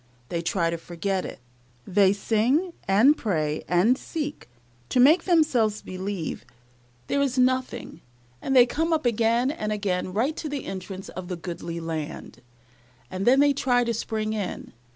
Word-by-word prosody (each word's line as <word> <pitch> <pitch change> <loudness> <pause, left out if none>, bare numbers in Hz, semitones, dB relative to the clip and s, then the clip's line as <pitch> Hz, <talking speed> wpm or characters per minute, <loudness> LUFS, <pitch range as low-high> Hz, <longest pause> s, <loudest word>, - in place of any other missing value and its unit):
They 170 - -2
try 170 0 0
to 170 - -3
forget 185 +3 -3
it - - -8 0.5
they 195 0 +4
sing, 235 - +1
and 225 +10 +5
pray, 155 - -1
and 180 +8 +3
seek, 295 - -5 0.4
to - - +1
make 310 +7 +6
themselves 265 - +2
believe 185 -2 -5 0.6
there 280 - 0
is 270 -2 0
nothing, 255 -8 0 0.4
and 270 - -1
they 245 -2 +8
come 325 +7 -1
up 310 -4 0
again 235 +2 +2
and 215 -9 -4
again 190 -3 -1
right 245 +11 0
to 310 - -4
the 280 -2 -4
entrance 190 0 -7
of 185 -1 -7
the 180 - -3
goodly 170 -1 -6
land, 160 -2 -6 0.7
and 185 +3 -3
then 265 +3 +6
they 285 0 +4
try 250 -3 +2
to 235 -1 -1
spring 215 -1 -2
in. 210 -3 -5
215 Hz, 160 wpm, -25 LUFS, 185-265 Hz, 0.7 s, they